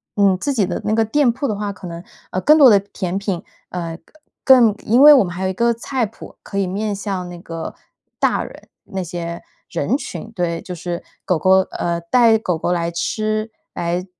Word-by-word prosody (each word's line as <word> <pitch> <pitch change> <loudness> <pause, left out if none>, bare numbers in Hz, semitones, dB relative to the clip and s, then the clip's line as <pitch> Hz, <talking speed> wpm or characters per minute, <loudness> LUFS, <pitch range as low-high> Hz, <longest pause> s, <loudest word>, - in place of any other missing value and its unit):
嗯 200 -2 +3
自 280 +8 -1
己 215 -7 +2
的 180 - -3
那 215 - +1
个 225 0 +3
店 280 +4 +2
铺 265 +3 -2
的 210 - -1
话， 205 0 -3
可 185 - -12
能， 170 0 -7 0.3
呃， 185 - -1
更 305 +8 +6
多 280 -4 +8
的 205 -3 +6
甜 190 -2 -4
品 195 -3 -3 0.3
呃 170 -2 -5 0.5
更 245 -5 +7
因 235 +4 +4
为 300 +1 +10
我 270 - +6
们 175 - -6
还 185 +2 -5
有 190 - +1
一 - - -2
个 235 +5 +2
菜 240 +2 -2
谱 220 - -12
可 200 - -6
以 200 - +2
面 205 +3 -2
向 195 -2 -4
那 175 - -8
个 165 -1 -6 0.5
大 - - +2
人 - - -13 0.2
那 190 -1 -4
些 170 -1 -5 0.3
人 215 - 0
群， 235 -4 -7
对， 170 -4 -2
就 180 - -7
是 175 +1 -5 0.2
狗 180 -4 +2
狗 190 +3 +5
呃 170 0 -2
带 225 +5 +4
狗 180 -6 -2
狗 165 - -1
来 170 -1 -1
吃、 215 +5 -2 0.2
来 175 +1 -2
195 Hz, 230 characters per minute, -20 LUFS, 175-225 Hz, 0.5 s, 为